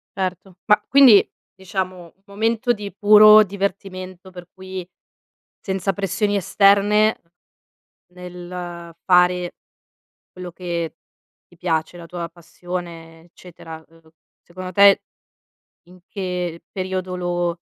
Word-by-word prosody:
Certo. 185 -1 -5
Ma 210 0 +4
quindi, 265 -7 +6 0.3
diciamo, 185 -1 -5
un 195 - -41
momento 225 +4 -1
di 205 -2 -7
puro 215 +1 +7
divertimento 185 -1 -6
per 180 -1 -12
cui, 185 -1 -8 0.7
senza 190 0 -2
pressioni 205 +2 -1
esterne, 205 +3 +3 0.9
nel 175 -1 -9
fare 180 -1 +2 0.8
quello 180 -1 -9
che 170 -2 -4 0.5
ti 175 - -23
piace, 165 0 -2
la 170 - -11
tua 170 0 -6
passione, 170 -1 -9
eccetera, 165 -2 -13
uhm, 165 -1 -23 0.3
secondo 185 +1 -9
te, 200 +1 +6 0.9
in 180 +1 -17
che 180 -4 -4
periodo 185 -1 -4
lo 175 -1 -2
185 Hz, 105 wpm, -21 LUFS, 175-200 Hz, 0.9 s, puro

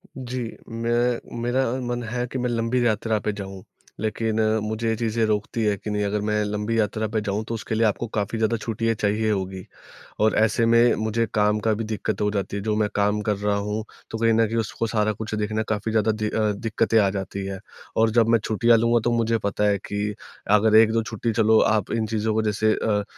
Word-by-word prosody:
जी, 130 -1 -5 0.3
मैं 120 +1 -1
मेरा 125 +2 +1 0.2
मन 120 0 -2
है 125 +1 -2
कि 130 - -3
मैं 125 0 -1
लंबी 120 +1 0
यात्रा 110 0 +1
पे 105 - -2
जाऊँ 95 -2 -8 0.4
लेकिन 110 0 -1 0.2
मुझे 110 +1 -2
ये 110 - +1
चीज़ें 115 0 -1
रोकती 110 +1 -1
है 105 -1 +2
कि 105 +2 -7
नहीं 105 0 -1
अगर 105 +1 -1
मैं 105 0 0
लंबी 105 +2 -2
यात्रा 110 +1 0
पे 110 - +1
जाऊँ 105 +1 -2
तो 115 - -3
उसके 110 0 -3
लिए 115 +1 +3
आपको 115 +3 -2
काफ़ी 105 +2 -1
ज़्यादा 110 +1 +1
छुट्टियाँ 115 +1 -1
चाहिए 105 +1 0
होगी। 95 -2 -3 0.5
और 110 +1 +3
ऐसे 110 +2 +3
में 115 +1 +5
मुझे 110 +1 0
काम 105 0 +2
का 110 +1 +1
भी 115 +2 -3
दिक्कत 110 -1 -3
हो 105 - +2
जाती 100 -1 -3
है, - - -3
जो 110 -1 0
मैं 105 -1 +1
काम 105 +1 +1
कर 105 -1 0
रहा 105 0 0
हूँ 105 +2 -2 0.3
तो 115 - -4
कहीं 115 0 +3
न 115 0 +4
कहीं 115 +2 -2
उसको 115 +1 -2
सारा 110 -1 +1
कुछ 110 +2 -6
देखना 110 +1 -1
काफ़ी 110 +1 -1
ज्यादा 110 0 +2
दि 110 0 -2
अ, 110 -1 +1
दिक्कतें 115 +2 0
आ 100 -2 +3
जाती 95 0 -4
हैं। 95 -1 -5 0.4
और 110 0 +4
जब 115 -1 +3
मैं 115 -1 +4
छुट्टियाँ 115 +1 +3
लूँगा 115 +1 +3
तो 120 - +2
मुझे 115 0 +1
पता 105 +1 -1
है 100 - +2
कि 105 +1 -2 0.4
अगर 110 +1 +3
1-2 115 0 +3
छुट्टी 115 +1 -3
चलो 110 0 +4 0.2
आप 105 -3 -2
इन 115 -1 0
चीजों 110 0 -1
को 110 - +1
जैसे 110 +1 +2
अ, 105 -2 0
110 Hz, 225 wpm, -24 LUFS, 105-115 Hz, 0.5 s, में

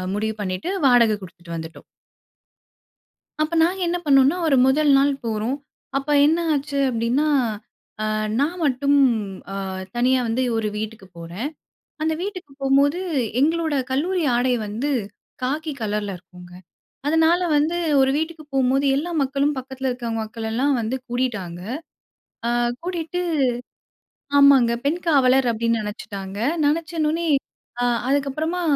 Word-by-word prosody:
முடிவு 220 +1 -2
அ - - -21
பண்ணிட்டு 185 - -3 0.2
வாடக 240 -4 +5
குடுத்துட்டு 170 -2 -10
வந்துட்டோம். 160 0 -8 1.6
அப்ப 310 +2 -1
நாங்க 365 +4 +1
என்ன 355 - 0
பண்ணோம்ன்னா, 275 +3 +5
ஒரு 275 - +4
முதல் 290 +3 +3
நாள் 280 +1 +3
போறோம். 225 +4 -1 0.4
அப்ப 275 +2 -2 0.2
என்ன 320 +3 +3
ஆச்சு 285 -1 -1
அப்டின்னா, 245 +6 +1 0.7
அ - - 0 0.4
நான் 325 +6 0
மட்டும் 280 +1 +2 0.5
அ - - -4 0.4
தனியா 255 +2 +3
வந்து 245 +3 0
ஒரு 220 -1 0
வீட்டுக்குப் 210 -4 -7
போறேன். 175 +10 -5 0.5
அந்த 320 +1 +1
வீட்டுக்கு 370 -6 -6
போம்போது, 280 +5 +3 0.4
எங்களோட 320 +1 +1 0.2
கல்லூரி 350 +6 0
ஆடை 250 +1 +2
வந்து, 230 +8 -2 0.5
காக்கி 305 +4 -2
கலர்ல 205 -2 -2
இருக்குங்க. 180 0 -15 0.5
அதனால 320 +3 +3 0.2
வந்து 310 +4 +1 0.2
ஒரு 265 0 +4
வீட்டுக்கு 320 -1 -4
போம்போது, 270 +1 +2
எல்லா 320 +5 -2
மக்களும் 280 +2 0
பக்கத்தில 265 0 -4
இருக்கிற 245 -2 -4
மக்களெல்லாம் 225 +5 -1
வந்து 225 +4 -2
கூடிட்டாங்க. 215 -9 -2 0.9
அ - - +1 0.3
கூட்டிட்டு, 350 0 -3 1.2
ஆமாங்க 270 -4 +6
பெண் 325 +5 0
காவலர் 265 -4 +4
அப்டின்னு 230 0 0
நெனைச்சுட்டாங்க. 200 -2 -6 0.3
நெனைச்சனோனே, 320 +1 0 0.5
அ - - +1 0.3
அதுக்கப்புறமா 285 +5 0
270 Hz, 125 wpm, -22 LUFS, 225-305 Hz, 1.6 s, ஆமாங்க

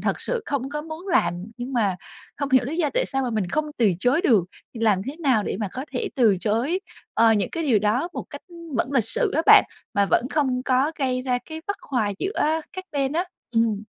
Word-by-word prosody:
thật - - -1
sự 480 -3 -2
không 270 -2 -2
có 300 +1 -3
muốn 325 +4 -8
làm 180 - +1
nhưng 250 +2 -6
mà 205 -7 +1 0.4
không 285 -1 -3
hiểu 260 -2 +5
lý 300 +6 -4
do 315 -4 +1
tại - - +2
sao 270 -1 -1
mà 250 - -1
mình 210 -5 -1
không 310 +7 +1
từ 215 -6 +4
chối 250 - +2
được. 220 - +4 0.3
Làm 215 -5 +1
thế 275 +7 -6
nào 265 -10 +2
để - - -3
mà 205 - -1
có 260 +2 -5
thể 250 - -2
từ 220 -7 +4
chối, 245 - 0 0.3
ờ, 225 0 +5
những 205 -4 0
cái 330 - -3
điều 245 -8 +3
đó 220 - +1
một - - -5
cách, - - -8
ưm, 335 -4 -10
vẫn 260 +4 0
lịch 240 -6 +3
sự 465 - 0
á 320 - +3
bạn, - - +9 0.3
mà 200 -1 +3
vẫn 250 - +3
không 260 -4 0
có 265 +5 +2
gây 255 -2 0
ra 250 -1 0
cái 320 0 -7
bất 405 - -2
hòa 225 -7 -1
giữa 320 -6 0
các 370 0 -6
bên 275 -1 0
á. 345 +3 0 0.3
Ừm. 225 -3 +1
260 Hz, 240 wpm, -24 LUFS, 225-315 Hz, 0.4 s, bạn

